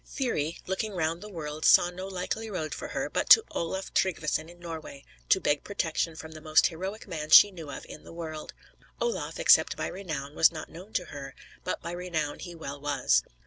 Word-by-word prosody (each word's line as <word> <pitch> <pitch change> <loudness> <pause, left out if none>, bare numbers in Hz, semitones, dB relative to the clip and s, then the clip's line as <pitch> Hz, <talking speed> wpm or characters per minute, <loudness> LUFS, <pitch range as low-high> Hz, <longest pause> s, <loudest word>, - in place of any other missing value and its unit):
Thyri, 170 - -2
looking 195 +3 -2
round 165 -1 -1
the 210 - -8
world, 155 -4 -6
saw 175 - +6
no 185 +2 -7
likely 195 +4 -4
road 160 -6 -3
for - - -5
her, - - -2
but - - -2
to 450 - +9
Olaf 190 +3 -3
Tryggveson 160 -3 0
in 175 0 -15
Norway; 160 -5 -8 0.2
to 190 - +5
beg 145 -5 +1
protection 165 -4 -1
from 160 0 -9
the 155 0 -10
most 155 0 +4
heroic 190 +6 -3
man 155 -4 -5
she 205 - +9
knew 165 -5 -9
of - - -7
in - - -11
the - - -12
world. 160 -2 -6 0.5
Olaf, 480 -1 -2
except - - +5
by - - -2
renown, 155 -7 -5
was 160 - +5
not 160 -2 -7
known 185 +6 -11
to 180 - 0
her; 135 -1 -8 0.3
but 185 - -3
by 170 - -4
renown 170 -4 -3
he 175 -2 -8
well 140 -3 -7
was. 135 - +2
165 Hz, 205 wpm, -28 LUFS, 155-185 Hz, 0.5 s, to